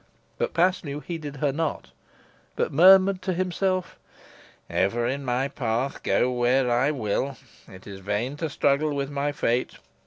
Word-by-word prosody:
But - - -2
Paslew 170 -5 +1
heeded 155 -4 -6
her 145 0 0
not, 160 +2 -3 0.6
but - - -1
murmured 190 +4 +6
to 185 0 -1
himself: 185 +1 -1 0.7
"Ever 115 +5 0
in 135 +3 -2
my 125 +1 0
path, 125 0 -2
go 125 - +1
where 125 +1 +2
I 125 +4 +2
will. 130 0 -2 0.3
It 95 0 -14
is 100 -2 -9
vain 105 +8 -2
to 160 +1 -3
struggle 145 0 +1
with 140 0 -3
my 145 +1 -1
fate. 125 -4 -1
140 Hz, 150 wpm, -25 LUFS, 125-160 Hz, 0.7 s, murmured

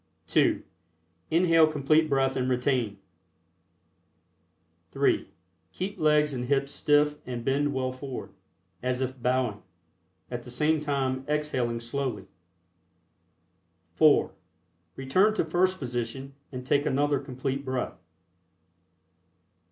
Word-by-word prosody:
(2) - - +2 0.7
Inhale 165 -1 +5
Complete 155 +2 +2
Breath 135 -1 +2
and 130 0 0
retain. 125 -4 0 1.9
(3) - - +1 0.4
Keep 190 +2 -4
legs 150 -1 +3
and 125 -1 -3
hips 140 +1 0
stiff 150 0 +2
and 120 -2 -5
bend 140 +2 +1
well 130 -1 -1
forward, 130 0 -7 0.5
as 125 0 -1
If 130 -1 -3
bowing, 125 -4 0 0.7
at 120 -1 -3
the 125 - -12
same 150 +6 +1
time 135 -3 -1
exhaling 140 -6 -1
slowly. 120 -4 -3 1.7
(4) 150 - +4 0.6
Return 185 +12 +2
to - - +1
first 185 +3 +1
position 125 +1 -4 0.2
and 125 -1 -6
take 145 +3 +2
another 145 +1 +1
Complete 135 0 -4
Breath. 130 -7 -3
135 Hz, 105 wpm, -27 LUFS, 125-150 Hz, 1.9 s, Inhale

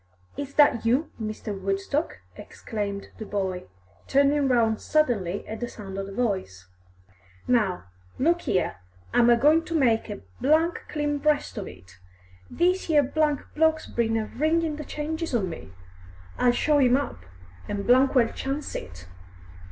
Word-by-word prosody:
"Is 280 0 -6
that 290 -6 +5
you, 255 +7 +1
Mr. 215 -1 -4
Woodstock?" 195 - -2
exclaimed 200 -3 -5
the 220 - -5
boy, 190 -3 -2 0.4
turning 280 +1 +3
round 230 -4 +2
suddenly 215 - 0
at 220 - -6
the 240 - -3
sound 195 -5 -9
of 195 - -4
the - - -8
voice. 190 - -2 0.8
"Now, 210 -7 +1 0.3
look 340 +5 +1
'ere, 185 - 0 0.4
I'm 240 0 +5
a 240 - +6
goin' 305 +6 +4
to 335 - -4
make 230 -6 +2
a 205 - -6 0.7
clean 295 -1 -1
breast 295 0 +1
of 200 - -6
it. 90 0 -14 0.5
This 365 0 +1
'ere 300 -2 +5
bloke's 310 +2 +1
been 225 -1 0
a 220 - -1
ringin' 315 +4 0
the 300 - -6
changes 315 0 -3
on 200 -5 +1
me; 160 - -9 0.7
I'll 245 - +5
show 295 +4 +2
him 255 -1 +5
up, 280 - -4 0.5
an' 200 -1 -3
well 260 +2 +5 0.2
chance 275 +2 -4
it. 90 -1 -8
245 Hz, 145 wpm, -26 LUFS, 205-295 Hz, 0.8 s, a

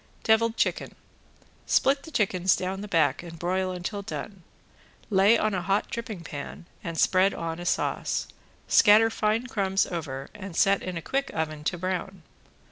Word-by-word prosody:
~DEVILED 225 +1 +3
CHICKEN~ - - -1 0.7
Split 275 +1 +3
the 320 - -11
chickens 190 - +2
down 190 +1 -3
the 210 - -6
back 160 -7 +2
and 170 -1 -10
broil 185 +2 -1
until 185 +3 -4
done, 200 -1 -7 0.7
lay 200 +4 +5
on 215 -1 0
a 185 - -1
hot 195 +3 0
dripping 225 -6 -5
pan 145 +1 -8 0.2
and 170 -3 -5
spread 190 +1 +3
on 165 0 -4
a 175 - -5
sauce, - - -1 0.4
scatter 220 +2 +6
fine 220 +2 0
crumbs 195 -5 +1
over 140 -6 -5
and 195 -4 -8
set 195 +3 +3
in 185 -2 -4
a 165 - -6
quick 275 0 -1
oven 155 -1 -3
to 175 - 0
brown. 185 0 -4
190 Hz, 165 wpm, -26 LUFS, 175-210 Hz, 0.7 s, scatter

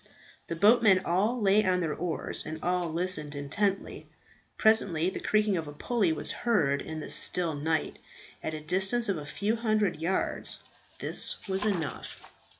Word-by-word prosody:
The 170 - -4
boatmen 205 0 +5
all 210 +8 +1
lay 205 0 +4
on 185 -2 +1
their 165 -4 -1
oars, 170 -1 -3
and 155 +1 -6
all 180 -2 -1
listened 160 -3 -1
intently. 195 +8 -2 0.5
Presently 190 -6 +3
the - - -6
creaking 210 -3 +1
of 160 -2 -4
a 145 - -8
pulley 200 +3 0
was 160 - -2
heard 150 -13 0
in 160 0 -6
the - - -2
still 175 -3 +3
night, 155 +2 -2 0.4
at 160 - -4
a 155 - -7
distance 190 +8 +2
of 195 - 0
a 145 -1 -8
few 200 +11 -1
hundred 215 -6 0
yards. 170 +4 -1 0.3
This - - 0
was 195 +2 0
enough. 175 -8 -3
180 Hz, 160 wpm, -28 LUFS, 160-210 Hz, 0.5 s, boatmen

